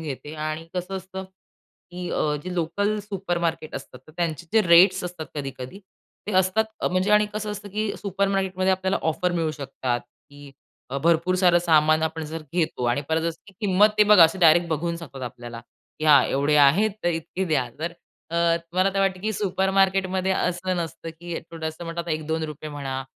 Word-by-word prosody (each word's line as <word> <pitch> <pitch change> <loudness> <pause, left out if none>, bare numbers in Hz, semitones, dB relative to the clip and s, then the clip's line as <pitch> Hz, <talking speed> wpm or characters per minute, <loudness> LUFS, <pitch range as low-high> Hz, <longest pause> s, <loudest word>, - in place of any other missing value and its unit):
घेते 150 0 -6
आणि 155 +1 -4
कसं 180 +2 -3
असतं 190 +1 -7 0.7
की 180 0 -6
अ, 150 -1 0
जे 185 0 -5
लोकल 200 +5 0
सुपरमार्केट 175 -6 -3
असतात 125 - -8
तर 155 - -16
त्यांचे 170 -1 -2
जे 225 - +5
रेट्स 180 +2 +6
असतात 175 -3 -6
कधी-कधी, 135 +3 -6 0.5
ते 210 - -3
असतात 190 +4 +2 0.2
अ, - - +1
म्हणजे 185 +3 0
आणि 210 0 +5
कसं 215 0 -3
असतं 205 0 -7
की 210 +1 -2
अ, - - -7
सुपरमार्केट 195 -1 -1
मध्ये 185 0 +3
आपल्याला 190 +1 0
ऑफर 180 +3 -1
मिळू 165 -2 0
शकतात 135 -4 -3
की 145 +2 -16 0.4
अ, 140 - -2
भरपूर 170 +4 +2
सारं 180 -2 +4
आपण 175 - +1
सामान 155 -2 +4
जर - - +1
आपण 160 0 -3
जर 160 +1 -6
घेतो 160 -7 -1
आणि 120 +4 +1
परत 160 0 +1
जसं 165 -1 -3
की 195 - -15
किंमत 205 0 +4
ते 210 - +7
बघा 205 -5 +8
असं 165 +4 +1
डायरेक्ट 170 0 +5
बघू 170 +2 -1
शकतात 140 -6 -9
आपल्याला 120 -1 -7 0.4
की, 155 - -4
"हां, 150 -2 +7
एवढे 145 +2 +1
आहेत 160 +10 +5
तर 175 - +3
इतके 170 +3 -3
द्या". 145 -8 0
तर 170 +3 -3 0.4
अ, 170 - -2 0.4
मला 185 +2 +2
तर 195 - +1
वाटतं 190 -2 +1
की 215 +2 -1
सुपरमार्केट 195 -1 +1
मध्ये 190 0 +1
असं 180 0 -1
नसतं 165 -1 -5
की 175 -1 -5
थोडंसं 160 0 -6
म्हणलं 165 +1 -4
आता 170 0 -6
₹1-2 155 -1 -3
म्हणा, 135 -2 -4
170 Hz, 195 wpm, -24 LUFS, 155-190 Hz, 0.7 s, बघा